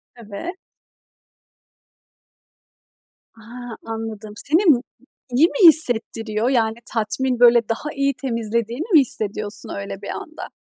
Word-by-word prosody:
Evet. 235 Hz, -, -8 dB, 2.8 s
A! 235 Hz, +1 st, -10 dB
Anladım. 220 Hz, -2 st, -7 dB
Seni 325 Hz, -, 0 dB
mu 280 Hz, -9 st, +4 dB, 0.5 s
iyi 270 Hz, +7 st, +4 dB
mi 385 Hz, -2 st, +4 dB
hissettiriyor? 230 Hz, -6 st, +4 dB
Yani, 225 Hz, -4 st, 0 dB, 0.2 s
tatmin, 245 Hz, +3 st, -2 dB
böyle, 235 Hz, -2 st, +4 dB
daha 295 Hz, +7 st, -4 dB
iyi 275 Hz, 0 st, 0 dB
temizlediğini 235 Hz, +1 st, -3 dB
mi 320 Hz, -, +8 dB
hissediyorsun 210 Hz, -4 st, -2 dB
öyle 100 Hz, 0 st, -7 dB
bir -, -, -8 dB
anda? -, -, -8 dB
235 Hz, 105 wpm, -20 LUFS, 220-270 Hz, 2.8 s, mi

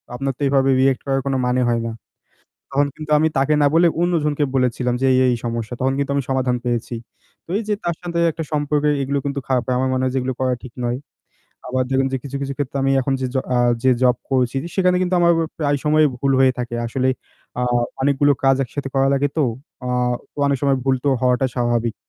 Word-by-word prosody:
আপনার 135 Hz, +1 st, -1 dB
তো -, -, -15 dB
এভাবে 135 Hz, 0 st, +2 dB
রিঅ্যাক্ট 135 Hz, -1 st, +2 dB
করার 135 Hz, 0 st, +1 dB
কোন 135 Hz, -, 0 dB
মানে 125 Hz, +1 st, +1 dB
হয় 115 Hz, -1 st, +1 dB
না। -, -, -3 dB, 0.8 s
তখন 140 Hz, +1 st, +2 dB
কিন্তু 155 Hz, -1 st, -8 dB
আমি 160 Hz, +1 st, +3 dB
তাকে 140 Hz, +3 st, +2 dB
না -, -, +5 dB
বলে 170 Hz, +1 st, +5 dB
অন্যজনকে 150 Hz, -4 st, +1 dB
বলেছিলাম 125 Hz, -1 st, +1 dB
যে -, -, +3 dB
এই, 130 Hz, -, +3 dB
এই -, -, 0 dB
সমস্যা। 115 Hz, 0 st, -3 dB
তখন 135 Hz, +1 st, +1 dB
কিন্তু 140 Hz, 0 st, -1 dB
আমি 140 Hz, -, +1 dB
সমাধান 130 Hz, -2 st, +1 dB
পেয়েছি। 120 Hz, 0 st, -2 dB, 0.5 s
তো -, -, -55 dB
এই -, -, -3 dB
যে 210 Hz, -, +2 dB
তার 170 Hz, -1 st, 0 dB
সাথে 170 Hz, -1 st, -3 dB
একটা 160 Hz, +1 st, -5 dB
সম্পর্ক 145 Hz, 0 st, 0 dB, 0.2 s
এগুলো 140 Hz, +1 st, -1 dB
কিন্তু 140 Hz, 0 st, -2 dB
খারাপ 130 Hz, -2 st, +1 dB
হয়। 125 Hz, -1 st, 0 dB
আমার 130 Hz, 0 st, +1 dB
মনে 130 Hz, 0 st, 0 dB
হয় 130 Hz, -, 0 dB
যে -, -, +2 dB
এগুলো 130 Hz, 0 st, -2 dB
করা 130 Hz, -1 st, +1 dB
ঠিক 120 Hz, -, -9 dB
নয়। 120 Hz, +1 st, -1 dB, 0.7 s
আবার 130 Hz, 0 st, 0 dB
দেখবেন 135 Hz, 0 st, +2 dB
যে -, -, +1 dB
কিছু, 140 Hz, 0 st, -5 dB
কিছু 140 Hz, 0 st, -3 dB
ক্ষেত্রে 140 Hz, -1 st, -3 dB
আমি 135 Hz, -, +2 dB
এখন 135 Hz, +1 st, -1 dB
যে 130 Hz, -, 0 dB
জ -, -, 0 dB, 0.2 s
আ -, -, +3 dB, 0.2 s
যে 130 Hz, -, +4 dB
জব 125 Hz, -2 st, +4 dB
করছি 130 Hz, 0 st, +1 dB, 0.2 s
সেখানে 180 Hz, -1 st, +3 dB
কিন্তু 180 Hz, 0 st, 0 dB
আমার 170 Hz, 0 st, +5 dB, 0.3 s
প্রায় 145 Hz, -2 st, +1 dB
সময়ই 155 Hz, 0 st, +4 dB
ভুল 135 Hz, +1 st, +1 dB
হয়ে 130 Hz, -1 st, +5 dB
থাকে। 120 Hz, -1 st, -4 dB
আসলে 130 Hz, +2 st, 0 dB, 0.5 s
আ -, -, 0 dB, 0.4 s
অনেকগুলো 145 Hz, +1 st, +3 dB
কাজ 135 Hz, 0 st, +5 dB
একসাথে 135 Hz, +3 st, -5 dB
করা 135 Hz, 0 st, +3 dB
লাগে 140 Hz, +1 st, +2 dB
তো। -, -, +4 dB, 0.4 s
আ -, -, -4 dB, 0.6 s
অনেক 140 Hz, -1 st, +2 dB
সময় 140 Hz, -1 st, +3 dB
ভুল 135 Hz, -1 st, +2 dB
তো -, -, +2 dB
হওয়াটা 125 Hz, +1 st, +2 dB
স্বাভাবিক। 120 Hz, -2 st, 0 dB
135 Hz, 225 wpm, -20 LUFS, 125-145 Hz, 0.8 s, না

